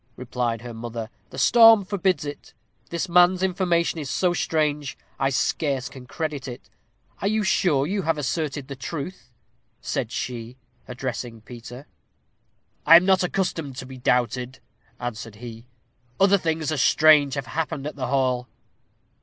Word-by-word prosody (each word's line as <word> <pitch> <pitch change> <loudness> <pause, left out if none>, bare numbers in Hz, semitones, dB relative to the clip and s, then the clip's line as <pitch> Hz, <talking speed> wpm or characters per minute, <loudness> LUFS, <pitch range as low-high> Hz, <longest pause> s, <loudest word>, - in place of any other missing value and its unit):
replied 120 -2 -3
her 120 -1 -7
mother; 115 0 -6 0.2
"the - - -11
storm 225 - +7
forbids 185 -6 0
it. 145 0 -8 0.3
This 170 +2 -2
man's 180 +1 +4
information 175 -3 +1
is 145 -3 -5
so 180 +3 +1
strange, 150 -4 -1 0.2
I 135 - +2
scarce 135 0 -1
can 130 -2 -12
credit 145 -2 -4
it. 120 -1 -9 0.5
Are 195 - 0
you 215 +1 +1
sure 150 -8 +2
you 195 +5 -1
have 165 -2 0
asserted 145 -1 -2
the 140 - -6
truth?" 150 +6 -6 0.5
said - - -3
she, 120 0 -5 0.3
addressing 125 -2 -5
Peter. 120 +3 -10 1.0
"I 165 - +8
am 175 +2 +7
not 190 -1 +4
accustomed 175 -7 -2
to 130 - -7
be 130 0 -10
doubted," 125 +1 0 0.4
answered 115 -3 -6
he. 115 +1 -10 0.5
"Other 195 +1 +5
things 160 -2 -1
as 145 -5 0
strange 150 -2 +5
have 140 -2 -3
happened 145 +2 -3
at 150 - -5
the 130 -3 -3
hall." 130 -2 0
145 Hz, 150 wpm, -24 LUFS, 125-170 Hz, 1.0 s, I